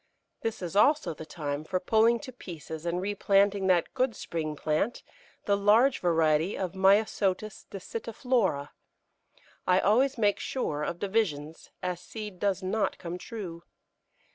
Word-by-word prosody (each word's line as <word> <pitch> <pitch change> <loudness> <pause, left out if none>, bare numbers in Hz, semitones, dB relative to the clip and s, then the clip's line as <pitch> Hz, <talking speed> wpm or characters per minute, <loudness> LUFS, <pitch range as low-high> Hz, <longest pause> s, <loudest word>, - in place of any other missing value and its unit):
] - - -52
This 225 -4 -3
is 175 +2 -5
also 290 - +4
the 155 +1 -10
time 145 -3 -4
for 185 +3 -1
pulling 225 +5 +3
to 270 - -8
pieces 160 - -8
and 170 +1 0
replanting 200 0 +2
that 180 -3 +2
good 255 -3 0
spring 155 -2 -4
plant, 155 +10 -1 0.4
the 200 - +3
large 220 +7 +4
variety 165 0 +2
of 185 -3 -2
Myosotis 195 +1 +2
dissitiflora; 220 - -1 1.0
I 180 0 +5
always 250 +7 +3
make 205 -3 +2
sure 150 - -2
of 170 +3 -2
divisions, 175 -7 -2
as 180 -1 -2
seed 210 -1 -8
does 195 -1 0
not 205 +3 0
come 175 0 -6
true. 180 -8 -7
195 Hz, 140 wpm, -28 LUFS, 170-220 Hz, 1.0 s, I